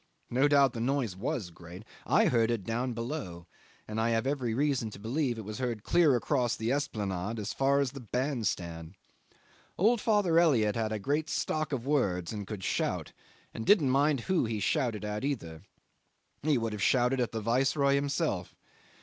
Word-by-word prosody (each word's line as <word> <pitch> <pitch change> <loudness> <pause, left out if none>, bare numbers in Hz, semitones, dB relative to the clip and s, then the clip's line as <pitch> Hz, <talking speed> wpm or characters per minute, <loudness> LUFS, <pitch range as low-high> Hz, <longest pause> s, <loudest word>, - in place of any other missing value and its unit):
No 130 +4 +3
doubt 140 -3 +4
the 115 - -5
noise 120 -5 0
was 95 -2 -3
great. 85 +3 -11 0.2
I - - +4
heard 115 -2 +3
it 115 -4 -1
down 120 +5 -2
below, 115 - -5 0.4
and 110 +1 -2
I 115 - +1
have 115 +1 +1
every 135 -4 -1
reason 135 -4 0
to 105 - -11
believe 120 +3 -1
it 110 - -7
was 105 0 -6
heard 120 -5 -2
clear 165 -6 +4
across 120 0 0
the 115 +2 -2
Esplanade 105 -6 -2
as 105 -1 -4
far 140 +1 +2
as 135 -3 -1
the 140 - -8
band 125 0 -1
stand. 85 0 -4 0.8
Old 220 +4 +3
father 205 -7 +3
Elliot 115 -11 +3
had 110 -2 -1
a 110 - -1
great 145 +9 -1
stock 155 0 -1
of 130 -3 -3
words 100 - 0
and 105 -2 -5
could 105 -4 -6
shout - - -1 0.4
and 115 - -5
didn't 150 - +4
mind 140 0 +2
who 175 +3 +1
he 110 -1 -2
shouted 115 - 0
at 105 +3 -3
either. 85 - -3 0.8
He 150 -1 +2
would 115 -2 -2
have 105 - -5
shouted 125 +4 +3
at 120 -4 0
the 115 - -3
Viceroy 135 +5 +2
himself. 140 - -1
120 Hz, 185 wpm, -30 LUFS, 105-140 Hz, 0.8 s, doubt